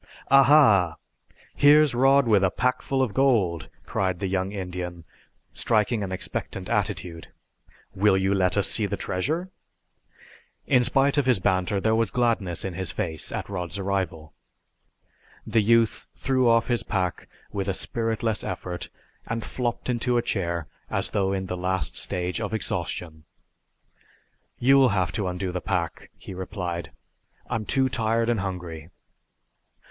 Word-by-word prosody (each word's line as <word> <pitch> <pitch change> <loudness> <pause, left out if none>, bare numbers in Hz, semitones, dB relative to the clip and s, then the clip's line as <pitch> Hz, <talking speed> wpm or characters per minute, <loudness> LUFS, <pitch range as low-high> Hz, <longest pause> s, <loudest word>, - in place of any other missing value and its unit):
"Aha, 135 - +6 0.6
here's 150 0 +5
Rod 135 +2 +4
with 105 -3 +4
a 95 - +4
packful 130 +5 0
of 115 -6 -2
gold!" 105 - +2 0.2
cried 95 -2 -1
the 100 - -3
young 95 0 -1
Indian, 90 -3 -5 0.5
striking 110 0 +1
an 95 -2 -4
expectant 95 - -4
attitude. 85 -2 -2 0.7
"Will 95 0 +3
you 95 +1 +1
let 95 -1 +1
us 100 - +3
see 105 -3 +2
the 100 - -3
treasure?" 155 - -2 1.1
In 125 -2 +4
spite 140 +3 +2
of 135 - 0
his 125 - +4
banter 95 +1 0
there 110 +3 +1
was 115 -2 +2
gladness 110 -9 0
in 95 - -3
his 95 +1 -2
face 80 -7 -3
at - - -4
Rod's 90 -1 -4
arrival. 95 -6 -3 1.1
The 110 - +2
youth 115 0 +2
threw 130 -2 +2
off 115 0 +4
his 120 -2 0
pack 95 -5 -2 0.2
with 100 -2 -3
a 95 - +1
spiritless 115 0 -1
effort 90 -1 -5 0.4
and 115 -1 -3
flopped 120 +1 -3
into 120 0 +1
a 120 - +1
chair 85 -7 -2 0.2
as - - -1
though 95 -1 +1
in 95 -1 -2
the 90 - -4
last 90 +1 -2
stage 90 +4 -1
of 110 +1 -2
exhaustion. 80 -5 -4 1.3
"You'll 135 +1 +5
have 90 -1 +1
to 105 -4 -2
undo 90 +1 -3
the 90 0 -3
pack," 85 -4 -3
he - - -9
replied. 90 -4 -5 0.6
"I'm 110 -1 -1
too 135 +3 +2
tired 115 -1 0
and 115 - 0
hungry." 90 -5 -5
100 Hz, 145 wpm, -25 LUFS, 90-120 Hz, 1.3 s, Aha